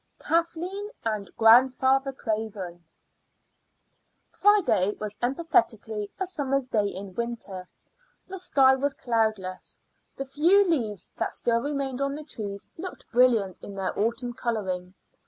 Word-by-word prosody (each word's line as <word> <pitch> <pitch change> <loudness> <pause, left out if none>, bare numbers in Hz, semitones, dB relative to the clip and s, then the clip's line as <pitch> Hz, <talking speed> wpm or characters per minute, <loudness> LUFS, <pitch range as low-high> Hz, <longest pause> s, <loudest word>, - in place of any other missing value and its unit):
KATHLEEN 345 +5 -1 0.2
AND 215 -3 -2
GRANDFATHER 260 +4 +5
CRAVEN. 210 -7 -4 1.5
Friday 380 - +3
was 210 -1 -4
emphatically 240 - 0
a 380 - 0
summer's 275 -7 -1
day 215 -5 +1
in 195 0 -6
winter. 220 -5 -5 0.6
The 380 0 -6
sky 265 -7 +5
was 275 +1 -1
cloudless; 220 -6 -1 0.4
the 275 - -3
few 340 +9 +4
leaves 225 - -1
that - - -2
still 235 -1 +1
remained 275 -1 -2
on 275 0 0
the 305 - -6
trees 200 -7 -5
looked 365 +2 -8
brilliant 230 -7 +3
in 200 - -9
their 190 -1 -2
autumn 235 +3 -1
coloring. 190 -6 -3
240 Hz, 120 wpm, -27 LUFS, 210-280 Hz, 1.5 s, GRANDFATHER